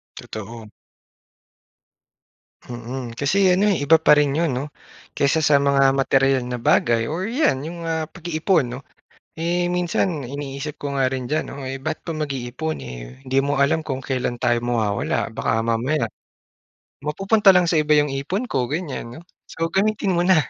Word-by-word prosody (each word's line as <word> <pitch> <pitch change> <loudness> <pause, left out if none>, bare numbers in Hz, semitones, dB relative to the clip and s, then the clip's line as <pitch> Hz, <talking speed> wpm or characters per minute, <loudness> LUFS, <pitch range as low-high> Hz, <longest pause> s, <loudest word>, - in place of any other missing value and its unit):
Totoo. 110 0 -8 2.0
Mm, 120 0 -6
kasi 190 +7 +3
ano, 200 +3 +3
eh, 175 - -2
iba 160 +3 +6
pa 160 -1 +5
rin 145 0 +2
'yon 165 -5 +1
'no 130 +3 -2 0.5
kaysa 145 +3 +2
sa 150 -2 +5
mga 140 -1 +3
materyal 135 -1 +2
na 125 -1 -4
bagay 115 -1 +2
or 170 +5 -2
'yan 220 - +1
'yong, 170 +1 -7
ah, 160 -1 -1
pag-iipon 165 -1 0
'no. 125 +1 -6 0.6
Eh, 175 +2 0
minsan 180 -1 0
iniisip 140 +1 -5
ko 145 -1 -5
nga 135 -2 +2
rin 130 -1 -4
diyan 155 +5 -1
'no, - - -8
ay 135 +1 -5
ba't 155 +3 -4
pa 165 - -3
mag-iipon, 150 0 -3
eh, 60 +1 -10
hindi 130 +1 -2
mo 140 +1 -1
nga 140 - +4
alam 160 +3 +1
kung 135 -4 -5
kailan 125 -2 -2
tayo 120 -1 +1
mawawala. 115 -4 -1
Baka 110 0 0
mamaya 120 +7 0 1.0
mapupunta 195 +5 +4
lang 180 -2 +4
sa 165 - +3
iba 150 0 +3
'yong 150 -1 +3
ipon 195 - -3
ko 130 -2 0
ganyan. 145 -3 -5 0.2
So, 165 0 -3
gamitin 205 0 +1
mo 170 - +2
na. 180 -5 +5
145 Hz, 165 wpm, -22 LUFS, 130-165 Hz, 2.0 s, iba